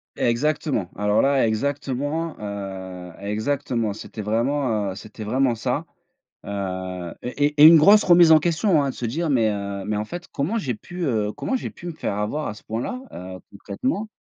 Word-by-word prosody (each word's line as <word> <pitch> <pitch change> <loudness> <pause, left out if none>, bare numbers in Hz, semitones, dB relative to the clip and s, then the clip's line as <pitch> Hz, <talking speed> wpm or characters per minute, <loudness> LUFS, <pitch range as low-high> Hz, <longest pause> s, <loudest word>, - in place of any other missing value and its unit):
Exactement, 140 - 0
alors 105 +1 +2
là, 135 -3 +3
exactement, 145 +6 -2
heu, 95 -3 -6
exactement 110 +1 -1
c'était 110 0 -8
vraiment, 115 -1 0
heu, 95 - -7
c'était 110 +1 -9
vraiment 125 +3 +1
ça. 115 - -2 0.6
Heu, 95 -3 -4
et 145 +4 0
et 150 0 +2
et - - +11
une 165 0 +10
grosse 205 +7 +7
remise 175 -2 +7
en 160 - +9
question, 165 0 +2
hein, 135 - 0
de - - -8
se 120 - -4
dire: 155 +7 -1
«Mais 115 -5 +3
heu, 100 -1 -4
mais 105 0 -1
en 105 - -1
fait 175 +9 -8
comment 170 +12 -1
j'ai 130 - -2
pu, 175 +11 -8
heu, 105 -6 0
comment 265 - -2
j'ai - - -4
pu 175 - -12
me 170 - -3
faire 130 -9 -3
avoir 130 +9 -2
à 105 - -4
ce - - -15
point 110 +2 -3
là, 255 - -4
heu, 90 +1 -8
concrètement?». 215 - -3
120 Hz, 195 wpm, -23 LUFS, 105-150 Hz, 0.6 s, et